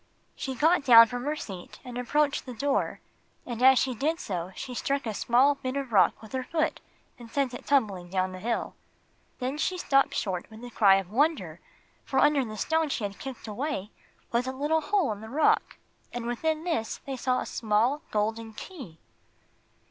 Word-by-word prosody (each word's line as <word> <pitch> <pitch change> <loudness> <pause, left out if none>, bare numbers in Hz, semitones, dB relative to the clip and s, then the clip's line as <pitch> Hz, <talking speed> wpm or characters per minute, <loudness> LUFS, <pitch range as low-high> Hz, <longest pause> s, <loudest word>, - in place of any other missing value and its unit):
She 265 -2 -4
got 320 +5 +3
down 230 -3 +9
from 245 +2 -5
her 300 +1 0
seat 190 -11 -8
and 250 -1 -8
approached 280 +4 0
the 250 - -6
door, 280 +4 -1 0.4
and 240 -1 -5
as 265 0 +7
she 260 0 +1
did 310 +8 -1
so 180 - -4
she 255 - -6
struck 275 +3 -1
a 220 - -2
small 250 +7 +3
bit 265 -2 -5
of 275 -3 -4
rock 190 +2 +4
with 220 - -12
her 260 - -2
foot 320 +4 -1 0.4
and 235 -1 -11
sent 270 0 -1
it 245 - -9
tumbling 200 -11 +1
down 185 0 0
the 185 - -8
hill. 230 +4 -2 0.6
Then 265 +3 -3
she 365 +3 0
stopped 275 -6 +2
short 185 -4 -2
with 220 +1 -12
a 245 - -8
cry 200 -4 +6
of 195 -1 -2
wonder, 295 +7 +1 0.4
for 265 - -3
under 290 0 +4
the 215 -3 -7
stone 320 +7 +1
she 235 - -2
had 200 -1 -4
kicked 265 -4 -8
away 220 -2 -3 0.4
was 240 +2 0
a - - -1
little 295 +4 0
hole 345 - +1
in 205 -1 -6
the 220 - -9
rock, 295 +6 +2 0.3
and 240 -1 -5
within 310 +7 -1
this 320 -11 -2
they 270 - -4
saw 255 0 0
a - - -4
small 230 +6 +1
golden 220 +1 -2
key. 245 - -10
250 Hz, 195 wpm, -28 LUFS, 220-285 Hz, 0.6 s, down